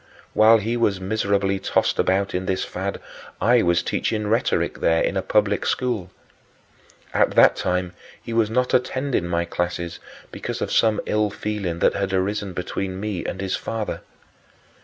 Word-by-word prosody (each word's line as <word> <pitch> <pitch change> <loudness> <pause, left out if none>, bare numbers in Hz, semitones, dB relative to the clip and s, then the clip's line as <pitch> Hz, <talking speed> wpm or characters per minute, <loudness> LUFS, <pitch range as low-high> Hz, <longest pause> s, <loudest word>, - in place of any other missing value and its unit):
While 110 +1 +6
he 115 +2 -2
was 105 -5 +1
miserably 100 0 0
tossed - - 0
about 95 +1 +1
in 90 +1 -2
this 95 - 0
fad, 95 +2 -4 0.4
I 120 +1 +4
was 85 -2 +2
teaching 105 -1 -1
rhetoric 110 +2 0
there 80 0 +2
in - - -1
a 95 - +1
public 105 +1 +1
school. 120 -8 -1 1.0
At - - +2
that - - +7
time 90 0 -1 0.3
he 115 - -7
was 115 -2 +2
not 125 +3 0
attending 130 -6 0
my 85 0 0
classes 85 0 -3 0.3
because - - -5
of - - -3
some 110 -2 +3
ill 105 0 +1
feeling 100 -4 -3
that - - +4
had 100 -1 -2
arisen 100 +1 -1
between 95 +1 -4
me 105 -3 -3
and - - -5
his 95 -1 -1
father. 110 -2 -4
100 Hz, 160 wpm, -23 LUFS, 95-110 Hz, 1.0 s, that